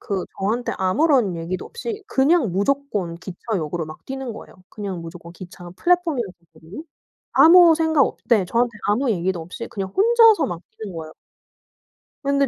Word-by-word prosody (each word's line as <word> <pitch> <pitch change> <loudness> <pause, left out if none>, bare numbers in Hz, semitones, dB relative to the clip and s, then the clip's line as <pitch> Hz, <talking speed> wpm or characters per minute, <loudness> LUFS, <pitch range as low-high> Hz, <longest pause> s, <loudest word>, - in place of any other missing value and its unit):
그 195 -4 -3
저한테 220 +5 -1
아무런 225 - +2
얘기도 175 +2 -4
없이 465 -3 -6
그냥 275 - +2
무조건 205 -5 -1
기차역으로 175 -3 -4
막 155 - -12
뛰는 265 -2 -5
거예요. 220 - -12
그냥 195 -4 -6
무조건 170 0 -10
기차 180 0 -11
플랫폼이었었거든요? 210 - -2 0.5
아무 340 0 +7
생각 320 -3 +2
없 - - -5
네. 215 -5 +3
저한테 235 +6 +1 0.2
아무 235 +5 +1
얘기도 185 -3 -1
없이 180 +8 -8
그냥 200 -5 -5
혼자서 455 -3 +5
막 175 -2 -5 0.2
뛰는 205 -4 -7
거예요. 160 -1 -8 1.1
근데 280 0 +2
210 Hz, 350 characters per minute, -22 LUFS, 175-280 Hz, 1.1 s, 아무